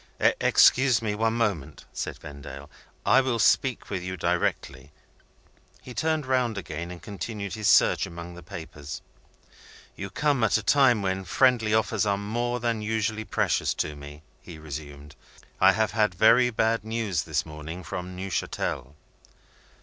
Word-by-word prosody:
"Excuse 130 -2 +4
me 110 -3 -2
for 105 - -4
one 115 0 +2
moment," 100 -12 -2
said - - -4
Vendale; 70 0 -10 0.3
"I 135 - +6
will 130 -3 -1
speak 130 +2 +2
to 100 - -3
you 95 +1 -5
directly." 75 -2 -2 0.9
He 125 - -9
turned 155 +1 0
round 125 -4 0
again, 85 -2 -5
and 90 -1 -8
continued 100 +1 -6
his 110 -2 -2
search - - +4
among 85 +1 -8
the 90 - -11
papers. 80 -5 -8 0.9
"You 100 - -6
come 140 +3 +1
at 110 - +3
a 110 - -5
time 125 -5 +4
when 95 0 -1
friendly 115 +2 +2
offers 110 -1 +1
are 100 -1 +1
more 120 +4 -2
than 115 -2 -1
usually 110 0 -1
precious - - 0
to 75 - -2
me," 75 +1 -11 0.2
he 85 - -11
resumed. 75 -1 -9 0.4
"I - - +6
have 110 +1 +1
had 105 -5 +1
very 115 +6 +5
bad 110 -1 +1
news 110 -6 -1
this - - -2
morning 80 +3 -8
from 90 +2 -6
Neuchatel." 90 -6 -3
105 Hz, 155 wpm, -26 LUFS, 85-115 Hz, 0.9 s, I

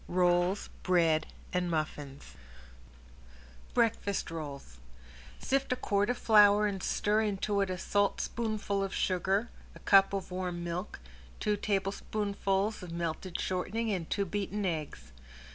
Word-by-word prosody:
ROLLS, 180 +2 +2
BREAD 165 -4 +3 0.3
AND 180 -1 0
MUFFINS 145 - -4 1.4
~BREAKFAST 210 -6 +1
ROLLS~ 140 - -7 0.6
Sift 275 0 0
a - - +3
quart 205 -3 0
of 245 - 0
flour 210 -2 +6
and 195 -2 -2
stir 210 +3 +1
into 205 -1 0
it 195 - 0
a 185 - -2
saltspoonful 205 +1 0
of 195 - -3
sugar, 190 +5 0 0.2
a - - -11
cup 195 -1 +6
of 195 -2 -3
warm 180 -1 -3
milk, 175 +3 -4 0.4
two 210 - +1
tablespoonfuls 200 0 -1
of 180 -2 -8
melted 170 +1 -3
shortening 215 +5 -1
and 180 -5 -3
two 200 - 0
beaten 205 +1 -2
eggs. 155 - -4
195 Hz, 125 wpm, -31 LUFS, 175-205 Hz, 1.4 s, flour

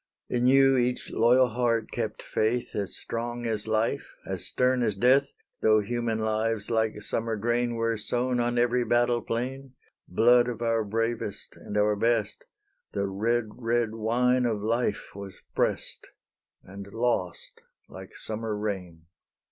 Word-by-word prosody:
In 125 0 +1
you 135 0 +5
each 125 0 -1
loyal 125 +3 +4
heart 115 -1 0
kept - - -4
faith 120 +3 -1
As 100 -2 -2
strong 120 +1 -4
as 110 -2 +1
life, 110 +1 -1
as - - -3
stern 125 0 +2
as 110 -4 +1
death; 130 +6 +3 0.3
Though 110 0 +5
human 115 +1 -2
lives 110 0 -1
like 110 -2 0
summer 115 +1 -2
grain 120 +2 0
Were 115 0 0
sown 125 +3 -1
on 120 0 0
every 120 +1 +2
battle 120 +1 +2
plain; 130 +3 -4 0.3
Blood 120 +5 +4
of 120 -3 -4
our 115 -1 +1
bravest 115 0 -3
and 105 - -6
our 105 0 +3
best, 115 -1 0 0.5
The 100 - 0
red, 110 +4 0
red 115 -2 0
wine 125 +3 +2
of 105 -3 -2
life 115 -1 -1
was 100 -2 -10
pressed, - - -1 0.6
And 100 +1 -10
lost 115 -7 -2 0.3
like 95 0 -11
summer 110 -1 -4
rain. 90 -6 -5
115 Hz, 145 wpm, -27 LUFS, 110-120 Hz, 0.6 s, you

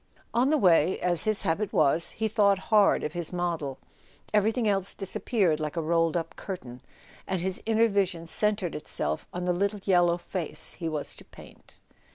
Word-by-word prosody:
On 245 +3 +3
the 310 - +3
way, 180 - +4
as 175 -2 +1
his 215 -1 0
habit 190 +5 -1
was, 155 +3 +2
he 220 - -1
thought 205 -2 +3 0.2
hard 210 -2 +5
of 150 - -3
his 175 -2 -4
model: 170 -6 -2 0.6
everything 220 +2 +2
else 195 -2 0
disappeared 195 -4 0
like 155 +2 -4
a - - +1
rolled 165 +1 +1
up 165 0 -5
curtain, 125 -11 -7 0.5
and 190 -1 -1
his 185 +2 -3
inner 225 +1 +4
vision 190 -5 -1
centred 205 0 +1
itself 75 - -3
on 180 0 -4
the 180 - +1
little 200 +3 -1
yellow 175 -3 +3
face 175 -1 -4
he 165 -2 -4
was 150 -2 -4
to - - -11
paint. - - -16
180 Hz, 180 wpm, -27 LUFS, 165-205 Hz, 0.6 s, hard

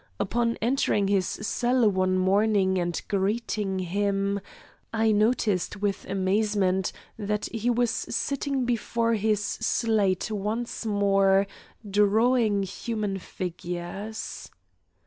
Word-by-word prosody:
Upon 235 +2 0
entering 225 -5 +2
his 195 -3 +2
cell 240 +2 +1
one 185 -2 +2
morning, 190 0 +2
and 175 -1 -1
greeting 200 0 -1
him, 200 +2 0 0.5
I 225 -1 +2
noticed 210 -3 +1
with 200 -1 -1
amazement 190 -1 +1 0.3
that 210 0 -1
he 230 +1 0
was 240 -1 +2
sitting 275 0 -1
before 230 -1 0
his 215 -1 +1
slate 215 -4 0
once 220 +3 -3
more 195 -1 +3 0.4
drawing 210 +1 +3
human 205 0 -3
figures. 180 +4 -6
205 Hz, 100 wpm, -26 LUFS, 195-225 Hz, 0.5 s, more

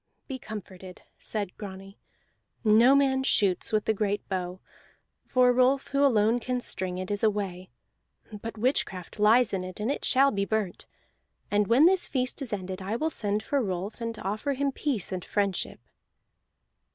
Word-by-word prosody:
"Be 265 -2 -5
comforted," 190 -5 -9 0.2
said 205 -4 -4
Grani. 195 -1 -9 0.6
"No 230 +5 +6
man 270 -1 +3
shoots 200 -8 +2
with 215 -1 +1
the 220 - +2
great 205 -1 -2
bow, 185 -1 -3 0.7
for 250 -1 +4
Rolf, 255 +2 +2
who 280 0 +1
alone 230 -3 +3
can 250 +1 -2
string 185 -6 -3
it, 185 +2 -4
is 205 +1 -2
away. 195 -4 -1 0.7
But 225 0 -6
witchcraft 210 -6 -1
lies 215 +2 +4
in 190 -1 -1
it, 185 +1 -7
and 220 +5 0
it - - -4
shall 275 +1 +4
be 200 -1 -1
burnt. 210 -3 -2 0.6
And 205 0 +2
when 250 +7 +5
this 370 +1 +4
feast 255 +1 -1
is 260 - -4
ended 190 -1 -4
I 195 +4 -3
will 315 +7 -1
send 210 -3 -1
for 280 +3 0
Rolf, 195 +1 -4
and 230 -1 -4
offer 215 +9 -2
him 275 +1 0
peace 260 - -2
and 185 -2 -3
friendship." 200 -3 -1
215 Hz, 165 wpm, -27 LUFS, 195-255 Hz, 0.7 s, No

